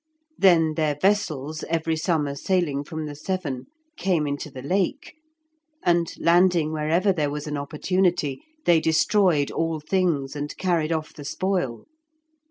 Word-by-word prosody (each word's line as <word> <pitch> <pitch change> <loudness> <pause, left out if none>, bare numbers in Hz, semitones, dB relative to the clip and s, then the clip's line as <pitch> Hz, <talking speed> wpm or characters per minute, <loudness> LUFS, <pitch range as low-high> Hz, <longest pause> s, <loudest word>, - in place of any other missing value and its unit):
Then 165 - +4
their 155 -2 0
vessels 155 -7 0
every 165 0 0
summer 155 -3 0
sailing 150 -2 0
from 155 +1 -5
the 150 - -6
Severn, 150 -4 -4 0.3
came 175 -6 +1
into 145 +1 -3
the 130 -2 -9
Lake, 190 - -1 0.7
and, 170 -1 +2
landing 170 -2 +3
wherever 165 +6 +1
there 150 -5 0
was 150 0 -4
an 150 -1 -3
opportunity, 155 +1 0 0.2
they 170 -2 +5
destroyed 160 -1 +2
all 165 -1 -1
things 155 -4 0
and 145 0 -5
carried 170 -4 0
off 160 -1 -2
the 145 - -10
spoil. 175 -6 -2
160 Hz, 140 wpm, -24 LUFS, 145-180 Hz, 0.7 s, they